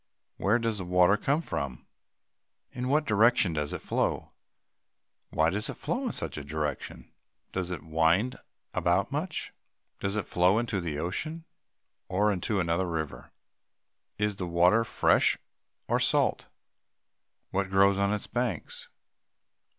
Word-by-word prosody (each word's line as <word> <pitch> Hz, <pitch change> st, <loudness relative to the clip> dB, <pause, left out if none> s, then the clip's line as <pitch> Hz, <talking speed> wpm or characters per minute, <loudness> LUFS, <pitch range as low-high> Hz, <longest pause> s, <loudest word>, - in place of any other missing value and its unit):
Where 105 Hz, +4 st, +3 dB
does 115 Hz, -3 st, -1 dB
the -, -, -3 dB
water 90 Hz, +2 st, +5 dB
come 145 Hz, +9 st, 0 dB
from? 70 Hz, -, -4 dB, 0.9 s
In 125 Hz, 0 st, -4 dB
what 150 Hz, +3 st, +2 dB
direction 110 Hz, -, +4 dB
does 75 Hz, -1 st, -2 dB
it -, -, -5 dB
flow? -, -, -1 dB, 1.0 s
Why 80 Hz, +1 st, +2 dB
does 105 Hz, +4 st, -1 dB
it -, -, -4 dB
flow 255 Hz, +2 st, -2 dB
in -, -, -1 dB
such -, -, -5 dB
direction? 75 Hz, +1 st, -4 dB, 0.4 s
Does 95 Hz, -2 st, -2 dB
it 90 Hz, -, -5 dB
wind 80 Hz, +10 st, +2 dB, 0.4 s
about 90 Hz, +3 st, +1 dB
much? 155 Hz, +4 st, -3 dB, 0.5 s
Does 100 Hz, +1 st, -2 dB
it 105 Hz, -, -1 dB
flow 90 Hz, +4 st, +3 dB
into 115 Hz, -5 st, -1 dB
the 80 Hz, -4 st, -3 dB
ocean, 155 Hz, -, -3 dB, 0.6 s
or 105 Hz, +3 st, +2 dB
into 100 Hz, +2 st, -1 dB
another 85 Hz, +1 st, +1 dB
river? 80 Hz, -4 st, -4 dB, 0.9 s
Is 105 Hz, -1 st, 0 dB
the 90 Hz, -, -3 dB
water 90 Hz, +6 st, +4 dB
fresh -, -, +3 dB, 0.5 s
or -, -, +2 dB
salt? -, -, +1 dB, 1.0 s
What 95 Hz, 0 st, 0 dB
grow 100 Hz, +1 st, +5 dB
on 100 Hz, +1 st, +1 dB
its 105 Hz, -1 st, -2 dB
banks? 120 Hz, -8 st, -3 dB
95 Hz, 135 wpm, -29 LUFS, 85-115 Hz, 1.0 s, water